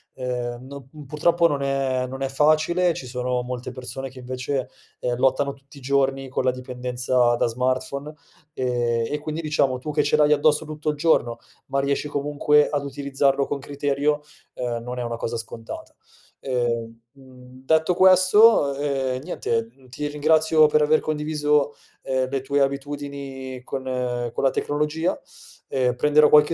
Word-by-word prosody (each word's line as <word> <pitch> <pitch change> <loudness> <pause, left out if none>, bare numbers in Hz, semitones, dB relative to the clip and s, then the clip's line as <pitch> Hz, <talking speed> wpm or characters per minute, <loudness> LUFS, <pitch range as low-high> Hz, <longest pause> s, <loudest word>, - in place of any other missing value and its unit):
ehm, 125 0 -4
no 140 -1 -10
mhmm, 150 -2 -11
purtroppo 170 +4 +2
non 145 -3 -2
è 135 -2 0
non 135 +1 -7
è - - 0
facile, 155 +5 +3
ci 130 - -7
sono 125 0 -2
molte 125 0 -5
persone 130 +1 -6
che 130 0 -13
invece, 130 +1 -3 0.3
ehm, 120 -1 -1
lottano 135 +2 +2
tutti 140 +1 -18
i - - -12
giorni 135 0 0
con 130 - -1
la 130 - +3
dipendenza 125 -1 0
da - - +1
smartphone, 130 +4 -2 0.4
ehm, 120 -3 0
e 150 - -1
quindi 155 +2 -4
diciamo 140 -4 +1
tu 150 +4 -5
che 150 0 +2
ce 145 - +2
l'hai 150 0 +5
addosso 150 +1 +2
tutto 155 0 -4
il 150 - -2
giorno, 120 -7 +2 0.3
ma 135 0 0
riesci 140 +2 0
comunque 145 +1 +2
ad 145 -1 -1
utilizzarlo 140 0 0
con 145 - -3
criterio, 145 +1 -1 0.3
ehm, 120 -2 -3
non 125 +1 -6
è - - -2
una 120 0 -3
cosa 115 - -3
scontata. 115 0 -8 0.4
Ehm, 115 -3 -2
mhmm, 130 -1 -16
detto 160 +3 +3
questo, 185 -3 +6
ehm, 135 -2 -1
niente, 115 -9 -2
mhmm, 130 0 -22
ti 145 +4 -4
ringrazio 155 +1 +4
per 150 0 +3
aver 155 +1 +4
condiviso, 150 -1 0 0.3
ehm, 130 -1 -1
le 135 -1 -2
tue 140 +1 0
abitudini 140 -2 -4
con 135 0 -5 0.5
con - - -3
la 135 - +5
tecnologia. 150 +5 -1 0.5
Ehm, 125 -2 0
prenderò 150 +3 +4
qualche 150 +2 +6
140 Hz, 165 wpm, -23 LUFS, 125-150 Hz, 0.5 s, questo